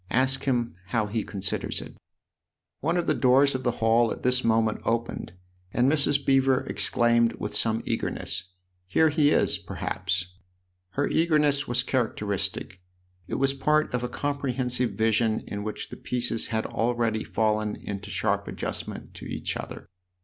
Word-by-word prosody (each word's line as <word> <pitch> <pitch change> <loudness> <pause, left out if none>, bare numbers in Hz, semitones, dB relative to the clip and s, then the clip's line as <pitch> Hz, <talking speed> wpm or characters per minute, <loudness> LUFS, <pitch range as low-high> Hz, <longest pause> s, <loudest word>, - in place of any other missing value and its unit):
Ask 130 +2 +1
him 120 -3 0
how 115 -3 +1
he 110 +2 -2
considers 95 -2 -2
it." - - -9 0.8
One 165 +5 0
of 175 - 0
the - - +2
doors 135 +2 +4
of 130 - -2
the 125 - +1
hall 115 +1 +4
at - - -6
this 125 0 +2
moment 110 -1 +2
opened, 115 -6 -2 0.4
and 125 +5 +3
Mrs. 145 -2 +2
Beever 135 -1 +4
exclaimed 120 -1 +2
with - - -5
some 115 -1 0
eagerness: 90 - -2 0.2
" 90 - -47
Here 160 - +4
he 150 -1 +3
is, - - +2
perhaps! 90 -1 -3 0.3
" 90 0 -48
Her 145 - +2
eagerness 150 -3 +2
was 120 +1 +2
characteristic; 100 -7 -1 0.5
it - - -3
was 135 0 +2
part 150 +2 +1
of 125 0 -1
a 125 - -2
comprehensive 125 -4 -1
vision 110 +1 +2
in 100 0 -5
which 105 0 -5
the - - -8
pieces 120 -2 -1
had 110 -1 -1
already 115 -2 0
fallen 110 -1 0
into 100 0 -6
sharp - - 0
adjustment - - -5
to - - -9
each - - -3
other. - - -7
120 Hz, 160 wpm, -26 LUFS, 110-135 Hz, 0.8 s, doors